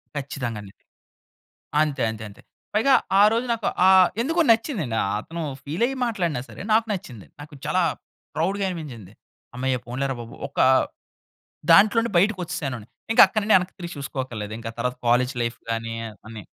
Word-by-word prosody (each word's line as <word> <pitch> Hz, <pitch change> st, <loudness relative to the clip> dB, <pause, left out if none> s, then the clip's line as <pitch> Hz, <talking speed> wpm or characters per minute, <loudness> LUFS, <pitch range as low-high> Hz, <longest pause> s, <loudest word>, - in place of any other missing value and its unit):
ఖ‌‌‌‌‌‌చ్చితంగాండి. 120 Hz, -8 st, -5 dB, 1.1 s
అంతే, 150 Hz, -3 st, 0 dB
అంతే, 110 Hz, -1 st, -8 dB
అంతే. 100 Hz, -, -16 dB, 0.3 s
పైగా 240 Hz, +6 st, +4 dB, 0.3 s
ఆరోజు 225 Hz, +4 st, +4 dB
నాకు 225 Hz, -2 st, -3 dB, 0.2 s
ఆహ్, 190 Hz, -1 st, +7 dB
ఎందుకో 325 Hz, +7 st, +1 dB
నచ్చిందండి. 225 Hz, -, 0 dB
ఆహ్, 100 Hz, -, -1 dB
అతను 165 Hz, +8 st, -7 dB, 0.2 s
ఫీలయ్యి 215 Hz, -, -1 dB
మాట్లాడినా 175 Hz, -, -1 dB
సరే -, -, -10 dB
నాకు 225 Hz, +1 st, +4 dB
నచ్చింది. 125 Hz, -, -8 dB, 0.2 s
నాకు 150 Hz, +1 st, -12 dB
చాలా 180 Hz, +5 st, +1 dB, 0.5 s
ప్రౌడుగా 195 Hz, +6 st, 0 dB
అనిపించింది. 130 Hz, -, -8 dB, 0.4 s
హమ్మయ్య! 130 Hz, +1 st, -1 dB
పోన్లేరా 135 Hz, +3 st, -2 dB
బాబు 115 Hz, 0 st, -9 dB
ఒకా 140 Hz, -, +2 dB, 1.1 s
దాంట్లో 205 Hz, +6 st, +6 dB
నుంచి 235 Hz, -, -4 dB
బయటకొచ్చేశాని. 165 Hz, -, -2 dB, 0.3 s
ఇంక -, -, +8 dB
అక్కడి 215 Hz, +2 st, -1 dB
నిండి 210 Hz, 0 st, +4 dB
యెనక్కి 180 Hz, 0 st, -4 dB
తిరిగి 175 Hz, -1 st, -6 dB
చూసుకోక్కర్లేదు. 130 Hz, -6 st, -5 dB
ఇంక 115 Hz, -, -7 dB
తర్వాత 125 Hz, +1 st, -1 dB
కాలేజ్ 125 Hz, +2 st, +3 dB
లైఫ్ 115 Hz, 0 st, -2 dB
గానీ, 115 Hz, 0 st, -2 dB, 0.3 s
అన్నీ. 110 Hz, -2 st, -9 dB
150 Hz, 145 wpm, -24 LUFS, 120-200 Hz, 1.1 s, ఇంక